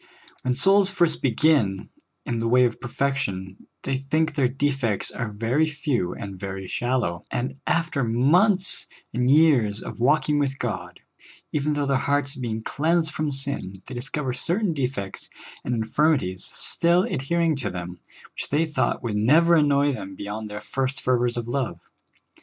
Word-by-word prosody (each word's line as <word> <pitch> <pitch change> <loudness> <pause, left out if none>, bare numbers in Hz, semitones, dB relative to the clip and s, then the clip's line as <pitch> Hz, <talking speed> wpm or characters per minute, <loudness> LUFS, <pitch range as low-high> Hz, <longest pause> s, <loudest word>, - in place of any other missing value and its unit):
When 125 -1 0
souls 195 +6 +5
first 175 -5 +1
begin 120 -6 +2 0.4
in 120 -1 -2
the 115 - -1
way 125 +2 +5
of 120 - -2
perfection, 110 -8 -3 0.2
they 135 -1 -1
think 155 +4 0
their 135 -4 +2
defects 135 -5 0
are 115 -4 -4
very 115 +9 +1
few 145 - -2
and 100 -2 -7
very 95 0 -5
shallow; 120 -7 -1
and 130 +3 -3
after 165 -5 0
months 175 - +2 0.3
and 125 +2 +1
years 135 -9 +4
of - - -8
walking 145 +3 +2
with 135 -1 -1
God, 115 -8 -5 0.5
even 150 0 0
though 145 -1 0
their 135 -1 +2
hearts 140 0 0
have 130 - -9
been 110 -2 -3
cleansed 160 +4 0
from 155 -1 -2
sin, 135 -9 -2
they 130 - -9
discover 130 +2 -3
certain 175 - 0
defects 125 -9 -4 0.3
and 120 - -1
infirmities 110 - +1
still 170 +2 +3
adhering 165 +3 0
to 125 -7 -2
them, 90 -1 -7 0.3
which - - -5
they 150 +3 +2
thought 135 -5 -1
would 115 -3 -2
never 155 +11 +4
annoy 145 -2 +4
them 95 -7 -6
be 100 - -8
yond 105 +1 -5
their 105 0 -6
first 135 +4 -2
fervors 120 -2 +1
of 120 -1 -3
love. 120 -9 -2
130 Hz, 165 wpm, -24 LUFS, 115-150 Hz, 0.5 s, souls